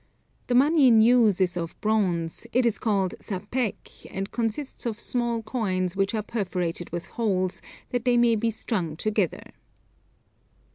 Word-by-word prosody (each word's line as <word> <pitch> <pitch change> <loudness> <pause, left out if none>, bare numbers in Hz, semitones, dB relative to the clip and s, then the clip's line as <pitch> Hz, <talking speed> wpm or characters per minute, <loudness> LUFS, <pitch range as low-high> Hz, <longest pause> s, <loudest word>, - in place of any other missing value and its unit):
The 245 - +1
money 285 +2 +5
in 230 -3 +6
use 225 -4 +5
is 180 -2 +3
of 165 -2 -5
bronze, 185 -7 0
it 250 0 +2
is 230 -2 +1
called 200 -5 0
sapèque 210 +4 -4
and 195 +1 -4
consists 240 +3 -3
of 225 -1 -4
small 235 -2 -1
coins 190 -6 -1
which 195 +3 0
are 215 - -1
perforated 180 -6 -3
with 170 0 -5
holes, 190 -6 -1 0.3
that 245 -2 -1
they 245 -1 +3
may 235 -1 +4
be 230 +1 0
strung 195 -7 -2
together. 210 -2 -1
215 Hz, 150 wpm, -26 LUFS, 185-235 Hz, 0.3 s, in